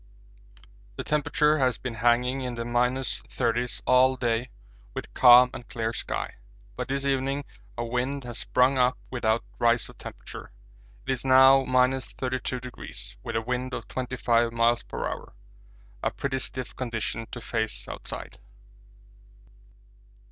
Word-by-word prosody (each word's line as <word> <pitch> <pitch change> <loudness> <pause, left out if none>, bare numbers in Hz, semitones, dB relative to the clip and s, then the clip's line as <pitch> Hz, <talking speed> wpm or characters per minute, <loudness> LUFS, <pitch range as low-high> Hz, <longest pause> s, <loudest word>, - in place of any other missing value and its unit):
The - - -4
temperature 150 0 +2
has 130 -2 +2
been 130 -2 -5
hanging 120 +3 +2
in 125 -2 -3
the 115 0 -4
minus 125 +2 0
thirties 120 0 -1
all 130 +1 +5
day 120 -1 -1 0.5
with - - -6
calm 125 0 +8
and 120 - -8
clear 115 0 -2
sky, - - -4 0.4
but - - -4
this 140 +1 -2
evening 135 +1 0 0.3
a 120 - -2
wind 125 +4 -2
has 120 -2 -6
sprung 125 +2 +2
up 125 0 +3
without 115 -2 +1 0.2
rise 120 -1 +2
of - - -15
temperature. - - -9 0.5
It - - -1
is 130 -2 -1
now 130 0 +7
32°, 130 -1 -1
with 115 - -5
a 115 - +1
wind 125 +2 -2
of - - -6
25 120 -2 0
m.p.h. 115 +1 -1 0.7
a - - +1
pretty 135 -1 -3
stiff 130 -1 -5
condition 115 -2 -3
to 120 - -7
face 110 -1 -2
outside! - - -6
125 Hz, 135 wpm, -27 LUFS, 120-130 Hz, 0.7 s, calm